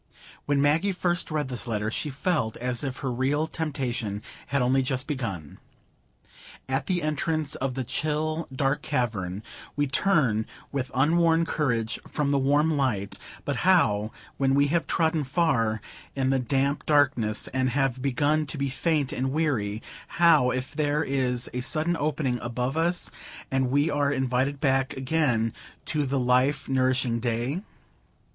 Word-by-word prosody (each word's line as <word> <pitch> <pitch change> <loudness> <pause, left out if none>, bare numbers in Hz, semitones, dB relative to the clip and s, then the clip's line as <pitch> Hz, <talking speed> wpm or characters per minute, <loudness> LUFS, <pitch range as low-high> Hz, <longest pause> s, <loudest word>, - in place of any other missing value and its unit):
When 145 -1 +2
Maggie 160 +7 +3
first 175 -1 0
read 150 -3 -1
this 125 -1 -4
letter 105 -1 -1
she 150 - -2
felt 140 -5 -1
as 125 +1 -2
if 135 -2 -3
her 130 - 0
real 135 +5 +1
temptation 130 -10 -3 0.2
had 140 - 0
only 130 +2 +3
just 130 0 -1
begun. 110 - -5 1.1
At 135 +1 -1
the 180 -3 0
entrance 155 0 -1
of 130 -1 -3
the 130 - -2
chill 155 +4 -1
dark 135 +2 0
cavern, 105 -9 -2 0.3
we 145 - +1
turn 135 - +2 0.2
with 135 -2 -2
unworn 165 +4 +3
courage 120 -9 -1
from 145 -2 -1
the 140 - +3
warm 145 +4 +3
light; 115 -8 -1 0.3
but - - -1
how, 105 +1 +3 0.3
when 135 0 +2
we 140 0 +3
have 170 +2 +1
trodden 160 -2 +1
far 130 - +1 0.3
in 135 -1 +1
the 135 - +2
damp 140 +2 0
darkness, 130 -8 +2
and 130 0 0
have 130 -1 0
begun 145 +3 +1
to 150 - -4
be 140 0 -1
faint 145 0 0
and 130 +1 -1
weary; 120 -9 -1 0.3
how, 165 -7 +6
if 130 +1 -3
there 150 0 +1
is 130 -3 0
a 125 - -2
sudden 160 +6 0
opening 145 -5 -1
above 125 +3 -2
us, 170 +2 0 0.4
and 135 -1 +1
we 145 +4 +2
are 145 -1 +1
invited 130 +1 0
back 135 -2 +1
again 130 -5 +1 0.3
to 150 -3 0
the 135 +1 0
life 125 +3 +2
nourishing 130 -2 +1
day? 120 +7 -1
135 Hz, 155 wpm, -26 LUFS, 125-150 Hz, 1.1 s, how